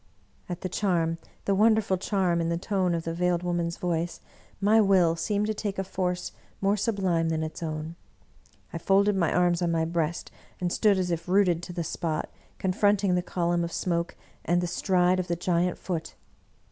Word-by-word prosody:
" -, -, -35 dB
At 175 Hz, 0 st, -5 dB
the 185 Hz, -, -2 dB
charm, 170 Hz, -4 st, 0 dB, 0.3 s
the 200 Hz, -, +2 dB
wonderful 215 Hz, -1 st, +3 dB
charm, 185 Hz, -3 st, 0 dB
in 165 Hz, -, -1 dB
the 170 Hz, -, 0 dB
tone 185 Hz, -1 st, 0 dB
of 165 Hz, -, -3 dB
the 165 Hz, -, -3 dB
Veiled 175 Hz, 0 st, 0 dB
Woman's 170 Hz, -1 st, -1 dB
voice, 170 Hz, -1 st, -2 dB, 0.4 s
my 210 Hz, +3 st, +5 dB
will 185 Hz, -5 st, +4 dB
seemed 205 Hz, +5 st, 0 dB
to 215 Hz, -, -1 dB
take 205 Hz, -2 st, -4 dB
a 195 Hz, -, 0 dB
force 180 Hz, -1 st, -2 dB, 0.3 s
more 200 Hz, +1 st, +2 dB
sublime 190 Hz, -6 st, 0 dB
than 160 Hz, -1 st, -1 dB
its 160 Hz, +3 st, -6 dB
own. 155 Hz, 0 st, -4 dB, 0.8 s
I -, -, -3 dB
folded 200 Hz, +1 st, +3 dB
my 175 Hz, -4 st, +1 dB
arms 175 Hz, -1 st, +2 dB
on 175 Hz, -, +1 dB
my 165 Hz, -1 st, +1 dB
breast, 165 Hz, 0 st, -2 dB, 0.3 s
and 175 Hz, -1 st, -1 dB
stood 210 Hz, -3 st, +3 dB
as 180 Hz, -1 st, -1 dB
if 170 Hz, 0 st, -3 dB
rooted 180 Hz, -3 st, +3 dB
to 175 Hz, -, -7 dB
the 170 Hz, -1 st, -2 dB
spot, 160 Hz, -1 st, -3 dB, 0.3 s
confronting 200 Hz, 0 st, +2 dB
the 180 Hz, -, +2 dB
column 175 Hz, -1 st, 0 dB
of 170 Hz, -, -3 dB
smoke 170 Hz, -1 st, -1 dB, 0.3 s
and 175 Hz, +2 st, +2 dB
the 175 Hz, -, -1 dB
stride 180 Hz, +1 st, +2 dB
of 180 Hz, -, -2 dB
the 170 Hz, -, 0 dB
giant 175 Hz, +1 st, 0 dB
Foot. 170 Hz, -4 st, -4 dB
180 Hz, 195 wpm, -27 LUFS, 170-195 Hz, 0.8 s, my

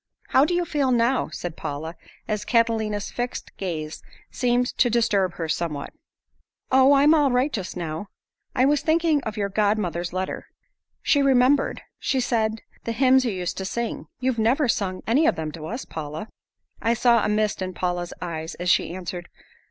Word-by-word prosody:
"How 270 Hz, -, +5 dB
do 350 Hz, +3 st, 0 dB
you 350 Hz, 0 st, +1 dB
feel 285 Hz, -5 st, 0 dB
now?" 245 Hz, +1 st, +2 dB
said 175 Hz, -2 st, -6 dB
Paula 155 Hz, +4 st, -5 dB, 0.3 s
as 210 Hz, -1 st, -2 dB
Catalina's 220 Hz, -3 st, +1 dB
fixed 245 Hz, 0 st, -4 dB
gaze 160 Hz, -5 st, -4 dB, 0.3 s
seemed 245 Hz, 0 st, +1 dB
to 245 Hz, -, +5 dB
disturb 200 Hz, -6 st, +1 dB
her 165 Hz, -, -3 dB
somewhat. 155 Hz, -3 st, -3 dB, 0.8 s
"Oh, 265 Hz, +2 st, +6 dB
I'm 285 Hz, +3 st, +6 dB
all 295 Hz, -3 st, +4 dB
right 255 Hz, +3 st, +1 dB
just 190 Hz, -3 st, -4 dB
now. 165 Hz, +3 st, -4 dB, 0.5 s
I 255 Hz, 0 st, +4 dB
was 290 Hz, +1 st, +3 dB
thinking 320 Hz, -2 st, +2 dB
of 215 Hz, 0 st, -4 dB
your 200 Hz, -1 st, 0 dB
god 210 Hz, +1 st, +2 dB
mother's 175 Hz, -3 st, -2 dB
letter. 185 Hz, +1 st, -4 dB, 0.6 s
She 285 Hz, -, +3 dB
remembered, 270 Hz, +1 st, +3 dB, 0.2 s
she 265 Hz, -, 0 dB
said, 220 Hz, -3 st, 0 dB, 0.2 s
the 230 Hz, -, -2 dB
hymns 260 Hz, +1 st, +4 dB
you 235 Hz, -, +1 dB
used 180 Hz, -2 st, -3 dB
to 190 Hz, -, -3 dB
sing. 235 Hz, +3 st, -3 dB
You've 255 Hz, -2 st, 0 dB
never 255 Hz, +6 st, +3 dB
sung 190 Hz, -5 st, -1 dB
any 280 Hz, +8 st, +3 dB
of -, -, +3 dB
them 155 Hz, -1 st, -4 dB
to 155 Hz, 0 st, -8 dB
us, 240 Hz, +8 st, -5 dB
Paula." 155 Hz, +6 st, -6 dB, 0.5 s
I 230 Hz, +1 st, +2 dB
saw 235 Hz, -2 st, +4 dB
a -, -, +1 dB
mist 210 Hz, -1 st, 0 dB
in 185 Hz, -1 st, -4 dB
Paula's 175 Hz, -1 st, -2 dB
eyes 160 Hz, -2 st, -5 dB
as 180 Hz, 0 st, +1 dB
she 170 Hz, -, +1 dB
answered. 175 Hz, -1 st, -6 dB
220 Hz, 180 wpm, -24 LUFS, 180-255 Hz, 0.8 s, Oh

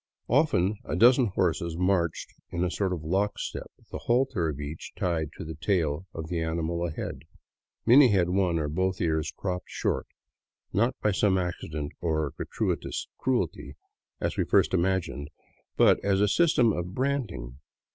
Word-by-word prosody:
Often 110 Hz, -, +2 dB
a -, -, -3 dB
dozen 125 Hz, +1 st, +6 dB
horses 85 Hz, -3 st, -1 dB
marched 90 Hz, -2 st, 0 dB, 0.2 s
in 85 Hz, -1 st, -2 dB
a 90 Hz, -, 0 dB
sort 95 Hz, -1 st, -1 dB
of 85 Hz, -4 st, -3 dB
lockstep, 95 Hz, +6 st, -2 dB, 0.2 s
the -, -, -5 dB
halter 120 Hz, -9 st, +1 dB
of 75 Hz, -2 st, -5 dB
each 75 Hz, +2 st, -7 dB
tied 80 Hz, -4 st, -1 dB
to -, -, -6 dB
the 80 Hz, -, -5 dB
tail 80 Hz, 0 st, -1 dB
of 80 Hz, -2 st, -6 dB
the 85 Hz, -1 st, -2 dB
animal 85 Hz, +1 st, -1 dB
ahead. 75 Hz, -4 st, -5 dB, 0.7 s
Many 130 Hz, +4 st, +8 dB
had 95 Hz, -6 st, +2 dB
one 90 Hz, -2 st, +2 dB
or 75 Hz, -2 st, -1 dB
both 95 Hz, +4 st, -1 dB
ears 80 Hz, -2 st, 0 dB
cropped 90 Hz, -2 st, -3 dB
short, -, -, -1 dB, 0.7 s
not 115 Hz, +7 st, +2 dB
by 105 Hz, -, +3 dB
some 95 Hz, -1 st, +2 dB
accident 80 Hz, -4 st, -3 dB
or 80 Hz, -4 st, 0 dB
gratuitous -, -, -3 dB
cruelty, 120 Hz, -11 st, -1 dB, 0.4 s
as -, -, -2 dB
we -, -, +2 dB
at -, -, -11 dB
first -, -, +4 dB
imagined, 90 Hz, -5 st, 0 dB, 0.5 s
but -, -, +5 dB
as 100 Hz, -1 st, +2 dB
a 105 Hz, -, +4 dB
system 120 Hz, -1 st, +3 dB
of 90 Hz, +2 st, -4 dB
branding. 100 Hz, -, -2 dB
90 Hz, 160 wpm, -27 LUFS, 80-100 Hz, 0.7 s, Many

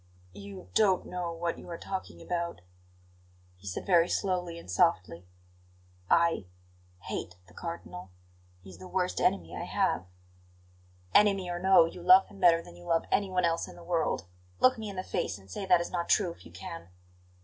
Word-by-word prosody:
"You 100 Hz, -2 st, -10 dB
don't 195 Hz, -4 st, +3 dB
know 180 Hz, -1 st, -4 dB
what 170 Hz, 0 st, -3 dB
you -, -, -11 dB
are 170 Hz, -, -5 dB
talking 175 Hz, -, -6 dB
about," 170 Hz, -, -3 dB, 0.9 s
he 95 Hz, +2 st, -14 dB
said 95 Hz, -, -4 dB
very 175 Hz, -2 st, +4 dB
slowly 180 Hz, -3 st, -1 dB
and 170 Hz, -, -11 dB
softly. 90 Hz, -1 st, +1 dB, 0.8 s
"I 170 Hz, -, +3 dB, 0.5 s
hate 90 Hz, -, -5 dB
the 90 Hz, -, -20 dB
Cardinal. 95 Hz, -, -7 dB, 0.5 s
He 95 Hz, -, -12 dB
is 90 Hz, -, -13 dB
the 95 Hz, -, -9 dB
worst 185 Hz, -1 st, -1 dB
enemy 85 Hz, -3 st, +1 dB
I -, -, -4 dB
have." 90 Hz, -, 0 dB, 1.1 s
"Enemy 195 Hz, -3 st, +4 dB
or 175 Hz, -, -3 dB
no, 190 Hz, -2 st, +6 dB
you 170 Hz, +2 st, -8 dB
love 245 Hz, +8 st, +7 dB
him 200 Hz, -, -14 dB
better 170 Hz, -2 st, +5 dB
than -, -, -13 dB
you 85 Hz, 0 st, -14 dB
love 165 Hz, 0 st, +1 dB
anyone 185 Hz, -3 st, +1 dB
else 165 Hz, 0 st, 0 dB
in -, -, -12 dB
the 175 Hz, -, -13 dB
world. 170 Hz, -, -1 dB, 0.3 s
Look 255 Hz, -, +5 dB
me 215 Hz, -1 st, -5 dB
in 200 Hz, -, -7 dB
the 185 Hz, -, -3 dB
face -, -, -2 dB
and 95 Hz, -1 st, -17 dB
say 195 Hz, -, -5 dB
that 180 Hz, -2 st, +6 dB
is 170 Hz, -, -5 dB
not 170 Hz, -1 st, -2 dB
true, 190 Hz, -5 st, +3 dB
if 170 Hz, -, -14 dB
you -, -, -16 dB
can!" 85 Hz, -2 st, -8 dB
170 Hz, 185 wpm, -29 LUFS, -, 1.1 s, love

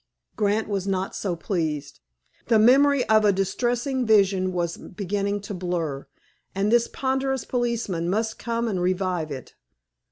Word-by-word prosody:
Grant 210 Hz, +1 st, +1 dB
was 200 Hz, -2 st, -2 dB
not 190 Hz, 0 st, -2 dB
so 185 Hz, -4 st, -2 dB
pleased. 155 Hz, -5 st, -3 dB, 0.5 s
The 230 Hz, -, +4 dB
memory 265 Hz, +4 st, +5 dB
of 215 Hz, 0 st, +5 dB
a 205 Hz, -, +5 dB
distressing 240 Hz, +7 st, -1 dB
vision 195 Hz, -4 st, +3 dB
was 175 Hz, -2 st, -2 dB
beginning 200 Hz, +1 st, -3 dB
to 205 Hz, +1 st, -7 dB
blur, 170 Hz, -7 st, -3 dB, 0.5 s
and 200 Hz, +2 st, +1 dB
this 235 Hz, 0 st, +4 dB
ponderous 265 Hz, -1 st, -1 dB
policeman 235 Hz, -9 st, -1 dB
must 220 Hz, +3 st, -1 dB
come 235 Hz, 0 st, -2 dB
and 190 Hz, -5 st, -1 dB
revive 180 Hz, -3 st, 0 dB
it. 135 Hz, -4 st, -8 dB
200 Hz, 140 wpm, -24 LUFS, 180-235 Hz, 0.5 s, memory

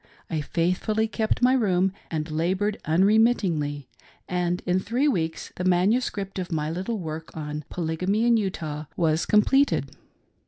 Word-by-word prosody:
I 160 Hz, -2 st, 0 dB
faithfully 185 Hz, +8 st, 0 dB
kept 220 Hz, +2 st, -1 dB
my 255 Hz, +1 st, +5 dB
room 190 Hz, -6 st, +2 dB, 0.2 s
and 155 Hz, -1 st, -3 dB
labored 185 Hz, +6 st, 0 dB
unremittingly; 170 Hz, -, +2 dB, 0.4 s
and 180 Hz, 0 st, -1 dB
in 180 Hz, +1 st, +2 dB
three 245 Hz, +9 st, 0 dB
weeks 165 Hz, -, -2 dB
the 180 Hz, -, -3 dB
manuscript 195 Hz, +2 st, +1 dB
of 180 Hz, 0 st, -5 dB
my 155 Hz, -1 st, -1 dB
little 190 Hz, +7 st, -3 dB
work 160 Hz, -3 st, -7 dB
on 150 Hz, -1 st, -5 dB
" -, -, -46 dB
Polygamy 180 Hz, +6 st, -1 dB
in 240 Hz, -1 st, +5 dB
Utah/' 155 Hz, -8 st, -3 dB
was 160 Hz, -2 st, +1 dB
completed. 270 Hz, +7 st, +3 dB
180 Hz, 145 wpm, -25 LUFS, 160-215 Hz, 0.4 s, my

